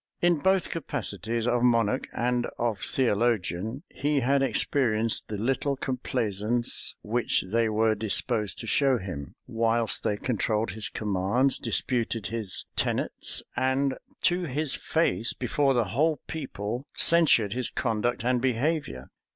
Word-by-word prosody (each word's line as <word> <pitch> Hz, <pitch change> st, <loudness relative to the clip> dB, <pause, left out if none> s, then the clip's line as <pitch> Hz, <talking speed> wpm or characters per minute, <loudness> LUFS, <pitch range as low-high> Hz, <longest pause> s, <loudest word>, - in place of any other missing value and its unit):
In 175 Hz, -2 st, +3 dB
both 190 Hz, +3 st, +2 dB
capacities, 115 Hz, -, -3 dB
of 120 Hz, 0 st, +1 dB
monarch 120 Hz, 0 st, +2 dB
and 120 Hz, 0 st, 0 dB
of 115 Hz, -4 st, -1 dB
theologian, 115 Hz, -, 0 dB
he 145 Hz, 0 st, 0 dB
had 135 Hz, +3 st, +2 dB
experienced 115 Hz, -5 st, +1 dB
the 105 Hz, -, -4 dB
little 135 Hz, +5 st, 0 dB
complaisance 120 Hz, -3 st, -1 dB
which 115 Hz, +3 st, +1 dB
they 115 Hz, 0 st, +2 dB
were 110 Hz, +1 st, +2 dB
disposed 105 Hz, -1 st, +1 dB
to -, -, -7 dB
show 135 Hz, +2 st, +3 dB
him; 90 Hz, -, -7 dB
whilst 115 Hz, -1 st, 0 dB
they 105 Hz, -, 0 dB
controlled 110 Hz, -2 st, -1 dB
his 105 Hz, +2 st, -3 dB
commands, 105 Hz, +6 st, 0 dB
disputed 115 Hz, -4 st, 0 dB
his 110 Hz, -5 st, -3 dB
tenets, -, -, 0 dB
and 130 Hz, +1 st, +1 dB, 0.3 s
to 175 Hz, 0 st, +2 dB
his 150 Hz, 0 st, -1 dB
face, 160 Hz, -8 st, 0 dB
before 135 Hz, +2 st, +1 dB
the 120 Hz, -, +3 dB
whole 155 Hz, +4 st, +2 dB
people, 125 Hz, -4 st, -5 dB
censured 150 Hz, -12 st, +4 dB
his 125 Hz, -1 st, -1 dB
conduct 120 Hz, 0 st, -1 dB
and 125 Hz, -1 st, +2 dB
behavior. 130 Hz, -, -1 dB
120 Hz, 130 wpm, -27 LUFS, 110-135 Hz, 0.3 s, censured